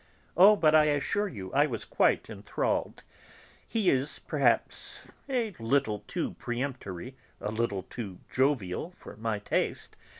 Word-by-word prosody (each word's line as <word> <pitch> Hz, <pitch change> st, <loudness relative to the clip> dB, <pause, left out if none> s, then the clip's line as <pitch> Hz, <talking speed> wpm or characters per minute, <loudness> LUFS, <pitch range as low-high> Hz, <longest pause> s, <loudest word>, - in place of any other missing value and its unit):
"Oh, 195 Hz, +5 st, +8 dB
but 155 Hz, -6 st, +4 dB
I 155 Hz, -1 st, +7 dB
assure 150 Hz, +8 st, +1 dB
you, 95 Hz, -, -7 dB
I 145 Hz, +2 st, +4 dB
was 115 Hz, -6 st, -4 dB
quite -, -, +2 dB
enthralled. -, -, -2 dB, 0.6 s
He 215 Hz, -5 st, +2 dB
is 135 Hz, +3 st, 0 dB
perhaps -, -, 0 dB, 0.2 s
a 235 Hz, -6 st, 0 dB
little 115 Hz, -2 st, +1 dB
too -, -, -2 dB
peremptory, 120 Hz, -3 st, -4 dB, 0.2 s
a 105 Hz, -, -3 dB
little 110 Hz, -4 st, -1 dB
too 100 Hz, -2 st, -7 dB
jovial 135 Hz, -, 0 dB
for -, -, -11 dB
my 110 Hz, 0 st, -2 dB
taste. 100 Hz, -, -1 dB
130 Hz, 135 wpm, -29 LUFS, 105-155 Hz, 0.6 s, Oh